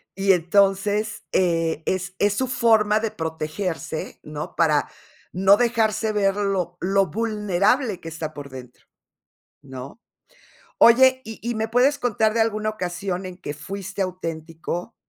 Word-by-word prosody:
y 195 Hz, 0 st, +4 dB
entonces, 200 Hz, +4 st, +1 dB
eh, 165 Hz, -3 st, +1 dB
es 185 Hz, 0 st, -1 dB
es 205 Hz, 0 st, +3 dB
su 260 Hz, +2 st, 0 dB
forma 220 Hz, -3 st, +3 dB
de 225 Hz, 0 st, -1 dB
protegerse, 160 Hz, 0 st, -4 dB
¿no?, 150 Hz, 0 st, -7 dB
para 155 Hz, -3 st, +2 dB, 0.4 s
no 195 Hz, +2 st, +5 dB
dejarse 220 Hz, -2 st, +1 dB
ver 195 Hz, -1 st, +2 dB
lo 190 Hz, -4 st, -1 dB
lo 195 Hz, +1 st, +2 dB
vulnerable 210 Hz, 0 st, 0 dB
que 165 Hz, -, -8 dB
está 160 Hz, -1 st, -5 dB
por 145 Hz, -1 st, -8 dB
dentro, 125 Hz, -2 st, -12 dB, 0.8 s
¿no? 130 Hz, -, -10 dB, 0.8 s
Oye, 260 Hz, +2 st, +6 dB
¿y 225 Hz, 0 st, -9 dB
y 235 Hz, -1 st, -2 dB
me 220 Hz, 0 st, -1 dB
puedes 255 Hz, +5 st, +3 dB
contar 220 Hz, -3 st, +1 dB
de 230 Hz, -, +1 dB
alguna 215 Hz, -1 st, 0 dB
ocasión 180 Hz, -1 st, -4 dB
en 185 Hz, -1 st, -8 dB
que 145 Hz, -, -6 dB
fuiste 195 Hz, +5 st, -7 dB
auténtico 170 Hz, +1 st, -4 dB
195 Hz, 140 wpm, -23 LUFS, 170-220 Hz, 0.8 s, Oye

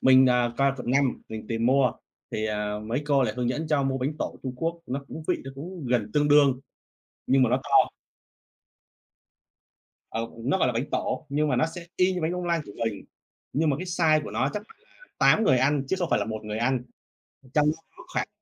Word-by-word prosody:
mình, 130 Hz, 0 st, +7 dB
ờ, 125 Hz, -1 st, +2 dB
qua 140 Hz, +1 st, +3 dB
quận 125 Hz, -1 st, -3 dB
5 135 Hz, 0 st, +1 dB
mình 110 Hz, -1 st, -7 dB
tìm 115 Hz, 0 st, 0 dB
mua, 130 Hz, -1 st, +4 dB, 0.4 s
thì, 110 Hz, -, -1 dB
ờ, 105 Hz, -1 st, -2 dB
mấy 115 Hz, +6 st, -2 dB
cô 140 Hz, -2 st, +3 dB
lại 110 Hz, -4 st, -1 dB
hướng 125 Hz, -1 st, 0 dB
dẫn 155 Hz, +5 st, -2 dB
cho 150 Hz, -2 st, +2 dB
mua 135 Hz, -1 st, 0 dB
bánh 135 Hz, +4 st, -1 dB
tổ -, -, -3 dB
Trung 130 Hz, -, -3 dB
Quốc, 165 Hz, +5 st, -2 dB
nó 140 Hz, +3 st, -4 dB
cũng 160 Hz, -, -7 dB
vị -, -, +1 dB
nó 135 Hz, -, -6 dB
cũng 165 Hz, +2 st, -7 dB
gần 110 Hz, -4 st, +1 dB
tương 145 Hz, 0 st, +2 dB
đương, 140 Hz, -3 st, +5 dB, 0.7 s
nhưng 135 Hz, 0 st, +5 dB
mà 125 Hz, -, +3 dB
nó -, -, +3 dB
to. -, -, +4 dB, 2.2 s
Ờ, 115 Hz, +1 st, -3 dB, 0.2 s
nó 140 Hz, +9 st, +2 dB
gọi -, -, +3 dB
là 125 Hz, -, +1 dB
bánh 115 Hz, +3 st, -1 dB
tổ, 155 Hz, -, -2 dB
nhưng 150 Hz, +2 st, +1 dB
mà 130 Hz, -, +1 dB
nó 155 Hz, -, +3 dB
sẽ 175 Hz, -2 st, -8 dB
y 185 Hz, +1 st, +3 dB
như 180 Hz, -, -2 dB
bánh 160 Hz, +2 st, 0 dB
bông 180 Hz, 0 st, -3 dB
lan 170 Hz, -1 st, +1 dB
của 100 Hz, -, -10 dB
mình, 110 Hz, -3 st, -3 dB, 0.5 s
nhưng 155 Hz, +1 st, +2 dB
mà 135 Hz, -, +1 dB
cái 185 Hz, -, -5 dB
size 160 Hz, -4 st, +3 dB
của -, -, -6 dB
nó 130 Hz, -, 0 dB
chắc 210 Hz, -, -3 dB
phải -, -, -18 dB
là -, -, -22 dB
8 225 Hz, -, +5 dB
người 130 Hz, -9 st, +4 dB
ăn 140 Hz, +2 st, +2 dB
chứ 190 Hz, -, +1 dB
không 175 Hz, -3 st, -1 dB
phải -, -, +3 dB
là -, -, 0 dB
1 110 Hz, -1 st, -4 dB
người 105 Hz, 0 st, -4 dB
ăn, 125 Hz, +1 st, +1 dB, 0.7 s
trong 150 Hz, -1 st, +4 dB
đó -, -, -7 dB, 0.2 s
có 345 Hz, -, -11 dB
khoảng -, -, 0 dB
135 Hz, 240 wpm, -26 LUFS, 125-155 Hz, 2.2 s, mình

